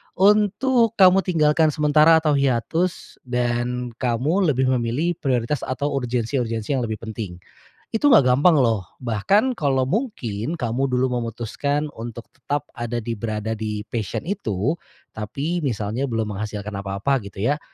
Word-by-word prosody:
untuk 215 +4 +3
kamu 190 -1 +6
tinggalkan 155 -3 +3
sementara 155 +1 +5
atau 150 -3 +3
hiatus, 140 +7 -1
dan 125 0 -1
kamu 140 - +1
lebih 130 0 +1
memilih 120 +9 0
prioritas 130 0 0
atau 140 +3 -2
urgensi-urgensi 120 -2 -2
yang 125 - 0
lebih 110 -2 -5
penting. 110 -5 -6 0.6
Itu 255 +6 +3
enggak 220 - +7
gampang 155 +5 +5
loh, 115 -9 +1
bahkan 165 - +1
kalo 135 - +1
mungkin 140 - -2
kamu 130 +1 -1
dulu 125 0 +1
memutuskan 140 +6 -3
untuk 115 0 -7
tetap 145 +1 -3
ada 120 0 -4
di 115 +1 -3
berada 110 0 -3
di 105 -1 -4
passion 110 0 -4
itu, 140 - -1 0.4
tapi 140 +11 -3
misalnya 120 0 -2
belum 110 -2 -2
menghasilkan 105 0 -5
apa-apa, 100 +7 -1
gitu 100 -1 -11 0.2
ya. 150 - -6
125 Hz, 140 wpm, -22 LUFS, 115-155 Hz, 0.6 s, enggak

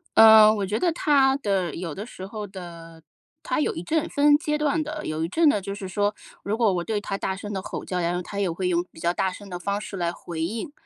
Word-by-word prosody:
呃， 220 -1 +9
我 200 - -1
觉 210 +4 -1
得 350 - +2
他 275 -4 +3
的 195 - -1
有 165 -3 -5
的 205 - -6
时 190 -6 -9
候 210 0 -6
的 170 -3 -10 0.4
他 255 - -1
有 300 - 0
一 165 - -5
阵 320 - 0
分 290 0 +4
阶 300 -1 -1
段 300 +1 +1
的。 305 0 -6
有 155 +1 -2
一 - - -3
阵 315 - +3
的 210 - +2
就 200 +1 -5
是 195 -2 -6
说， 205 +2 0 0.3
如 210 +2 -1
果 225 -3 +3
我 175 - -1
对 210 +2 -2
他 195 -1 -3
大 190 - -2
声 205 +2 -7
地 190 - -3
吼 - - -6
叫， 180 -1 -2
然 175 +1 0
后， 180 - -2
他 200 +3 -6
也 195 -3 +1
会 180 +2 -2
用 175 0 +1
比 160 - -15
较 170 +1 0
大 190 +1 0
声 200 +1 -11
的 180 - -5
方 200 +3 -2
式 200 - -7
来 170 -1 0
回 170 -2 -7
应。 225 - -4
200 Hz, 285 characters per minute, -25 LUFS, 180-230 Hz, 0.4 s, 呃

